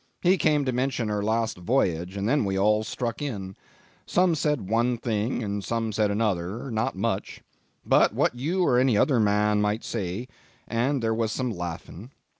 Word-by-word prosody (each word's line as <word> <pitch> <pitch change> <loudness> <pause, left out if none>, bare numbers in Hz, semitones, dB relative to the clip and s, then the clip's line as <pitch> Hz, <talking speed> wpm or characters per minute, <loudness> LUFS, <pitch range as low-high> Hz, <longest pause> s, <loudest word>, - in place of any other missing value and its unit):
He 180 +2 +5
came 150 -2 +2
to 130 - +1
mention 125 -2 -1
her 105 -1 -1
last 110 -1 -1
voyage, 90 -4 0
and 100 +1 -1
then 145 +3 +2
we 95 -1 -1
all 105 +2 +3
struck 115 +3 -4
in. 100 -9 -4 0.5
Some 180 -1 +3
said 150 -9 -1
one 120 +3 +1
thing 115 +1 -1
and 100 -1 -3
some 115 +2 -2
another 105 +2 0
not 110 +2 -1
much 95 0 -3 0.4
what - - +3
you 160 +10 -1
or 125 -5 +4
any 125 -4 +3
other 130 +2 +3
man 105 0 +2
might 105 +2 0
say; 105 +2 -4 0.4
and 125 +3 0
there 110 0 +1
was 110 -1 -1
some 125 +1 -2
laughing. 90 +3 -7
115 Hz, 170 wpm, -26 LUFS, 100-125 Hz, 0.5 s, He